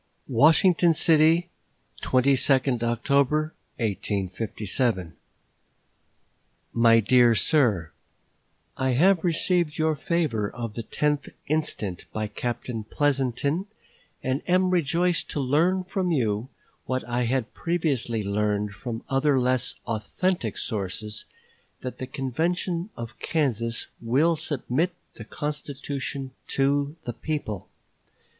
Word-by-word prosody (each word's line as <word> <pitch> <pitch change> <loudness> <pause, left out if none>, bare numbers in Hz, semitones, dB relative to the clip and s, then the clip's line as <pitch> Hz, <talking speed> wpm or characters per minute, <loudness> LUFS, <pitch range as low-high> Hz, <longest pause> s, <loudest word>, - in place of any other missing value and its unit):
WASHINGTON 165 - +5
CITY, 165 +3 +4 0.5
22d 130 -1 +3
October, 140 +6 +1 0.2
1857. 100 -1 -1 1.6
MY 115 -1 +5
DEAR 120 +1 +5
SIR: 110 - +2 0.9
I 130 -1 +1
have 175 +6 +4
received 175 -1 +1
your 155 -1 +2
favor 145 -10 0
of 115 -3 -6
the 115 - -4
tenth 150 +5 -1 0.2
instant 140 - -2
by 110 0 -2
Captain 120 +1 -4
Pleasonton 140 - 0 0.6
and 130 +2 0
am 185 +1 +3
rejoiced 175 +1 +1
to 150 - -3
learn 165 +8 +2
from 185 0 -2
you, 115 -6 0 0.4
what 130 -3 -2
I 120 0 0
had 125 -1 -1
previously 140 -10 -1
learned 105 +1 0
from 115 +2 -6
other 135 0 +2
less 125 0 +1
authentic 115 - -1
sources, 105 0 -3 0.6
that 125 - -6
the 130 - -4
convention 170 - -2
of 115 0 -7
Kansas 120 -7 0 0.2
will 140 +9 +3
submit 155 +4 0 0.2
the 110 - -10
constitution 140 -1 -4 0.2
to 140 +2 +1
the 120 - -3
people. 115 - -4
130 Hz, 105 wpm, -26 LUFS, 115-155 Hz, 1.6 s, WASHINGTON